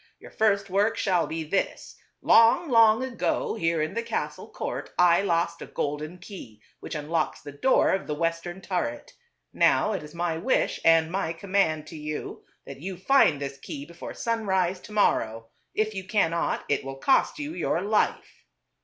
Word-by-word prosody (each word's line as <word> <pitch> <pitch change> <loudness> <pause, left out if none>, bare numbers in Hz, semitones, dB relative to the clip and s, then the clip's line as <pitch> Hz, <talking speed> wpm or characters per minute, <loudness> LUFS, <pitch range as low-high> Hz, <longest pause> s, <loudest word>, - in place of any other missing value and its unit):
Your - - -13
first 200 -2 +1
work 205 +4 +1
shall 180 -4 +1
be 160 0 -4
this: 175 +6 -2 0.3
Long, 230 +8 +5
long 230 0 +5
ago, 345 - -1
here 165 -1 0
in 155 - -3
the 230 - -1
castle 230 - -4
court - - -5
I 175 0 +5
lost 170 -3 0
a - - -7
golden 150 +4 -4
key, 180 - -11 0.2
which - - -7
unlocks 155 +2 -2
the 145 - -9
door 200 - +3
of 190 - -1
the 150 - -2
western 165 +3 -3
turret. 175 -13 -3 0.4
Now - - +3
it - - -3
is 150 +2 -12
my 170 -1 -1
wish 255 +9 0
and 165 0 +4
my 185 -3 -1
command 165 -4 0
to 160 - -10
you 150 0 -6 0.2
that 135 0 -10
you 185 +1 -5
find 185 - +4
this 140 -1 -5
key 140 - -7
before 170 +2 -9
sunrise 190 -6 0
to 210 - -13
morrow. 115 - +1 0.3
If 215 0 0
you 190 -1 -5
cannot, 170 -6 0
it 140 - 0
will 135 0 -6
cost 265 - +2
you 295 +1 -5
your 170 - -1
life." 210 +1 -1
175 Hz, 175 wpm, -26 LUFS, 155-210 Hz, 0.4 s, Long